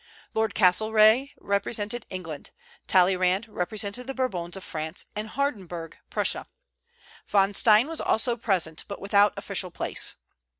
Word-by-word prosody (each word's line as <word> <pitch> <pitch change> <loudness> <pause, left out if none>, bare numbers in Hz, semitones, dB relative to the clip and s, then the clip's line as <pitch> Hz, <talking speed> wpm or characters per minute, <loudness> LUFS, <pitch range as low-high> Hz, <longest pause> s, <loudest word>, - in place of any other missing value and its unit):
Lord 220 0 0
Castlereagh 215 +6 +4
represented 210 +3 -2
England; 165 -6 -7 0.4
Talleyrand 185 +3 +3
represented 210 +4 -4
the 270 - -4
Bourbons 185 -9 -2
of 190 - -9
France; 155 +1 -5
and 215 +1 -4
Hardenberg, 190 - -3 0.2
Prussia. - - -1 0.8
Von 200 0 +3
Stein 215 +3 +5
was 325 0 -3
also 235 +2 +1
present, 185 -9 -1
but 200 - -7
without 200 +1 +4
official 195 -2 -3
place. 175 - +2
200 Hz, 125 wpm, -26 LUFS, 185-220 Hz, 0.8 s, Stein